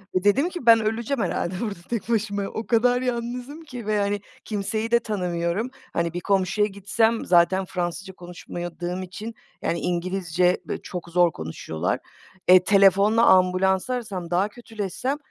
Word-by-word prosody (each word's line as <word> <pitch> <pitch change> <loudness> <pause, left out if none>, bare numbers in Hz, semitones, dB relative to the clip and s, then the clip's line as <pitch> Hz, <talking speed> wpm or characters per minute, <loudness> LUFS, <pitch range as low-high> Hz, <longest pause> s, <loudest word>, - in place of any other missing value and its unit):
ve 185 - +1
dedim 275 - +3
ki 350 -9 -7
ben 230 -1 +8
öleceğim 225 +3 -1
herhâlde 180 +1 -2
burada 210 -6 -4
tek 235 -1 -3
başıma 205 -3 0
o 220 +3 -5
kadar 245 +2 +3
yalnızım 250 +4 -4
ki 250 -8 -9
ve 210 -1 +1
hani 200 0 0 0.2
kimseyi 215 +2 -2
de 235 - +5
tanımıyorum, 180 0 -2 0.2
hani, 170 0 -1
bir 175 - -2
komşuya 195 +3 +1
gitsem 215 +3 0
zaten 180 +2 +4
Fransızca 180 +2 -4
konuşamadığım 175 +1 -6
için, 210 +5 -7 0.3
yani, 170 - -1
İngilizce 180 0 0
böyle - - -4
çok 175 -1 -7
zor 175 -1 +4
konuşuyorlar. 80 - -3 0.5
E, 185 0 +8
telefonla 200 +3 +5
ambulansı 190 +4 +3
arasam, 195 -8 -5
daha 185 +4 +2
kötüleşsem 230 +4 -4
200 Hz, 150 wpm, -24 LUFS, 180-225 Hz, 0.5 s, ben